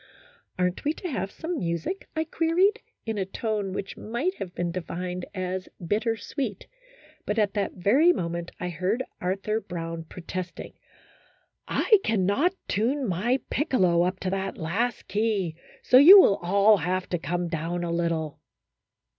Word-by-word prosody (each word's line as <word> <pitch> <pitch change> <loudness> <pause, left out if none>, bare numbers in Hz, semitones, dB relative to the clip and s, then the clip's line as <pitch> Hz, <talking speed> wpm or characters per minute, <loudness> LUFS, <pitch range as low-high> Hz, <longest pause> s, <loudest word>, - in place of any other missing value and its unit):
" - - -35
Aren't 180 0 -1
we 300 - +1
to 360 - -6
have 195 - -2
some 330 - -4
music?" 170 - -3
I 315 - +1
queried, 340 +6 +2 0.2
in 220 -2 -2
a - - +1
tone 210 -1 -2
which 195 +1 -5
might 240 - -2
have 180 -2 -6
been 175 -1 -1
defined 180 +1 -5
as 185 0 -3
bitter 220 +6 0
sweet; 220 0 -4 0.6
but 210 - -1
at 210 -2 +2
that 205 -2 -1
very 255 - +4
moment 170 - -3
I 180 - -3
heard 185 +9 -1 0.2
Arthur 195 +4 -1
Brown 165 -3 -6
protesting, 180 +1 -7 0.5
" - - -39
I 430 -4 +4
cannot 220 - +1
tune 255 +5 0
my 215 +9 0
piccolo 185 - +2
up 185 +2 0
to 185 - -1
that 195 0 -3
last 200 +8 -2
key, 205 -5 0 0.3
so 250 - +6
you 370 +8 +11
will 200 - +5
all 200 +4 +4
have 185 +2 -1
to 175 - -1
come 175 +4 -2
down 170 +1 -3
a 170 - -2
little." 165 -3 -1
195 Hz, 160 wpm, -26 LUFS, 175-235 Hz, 0.6 s, you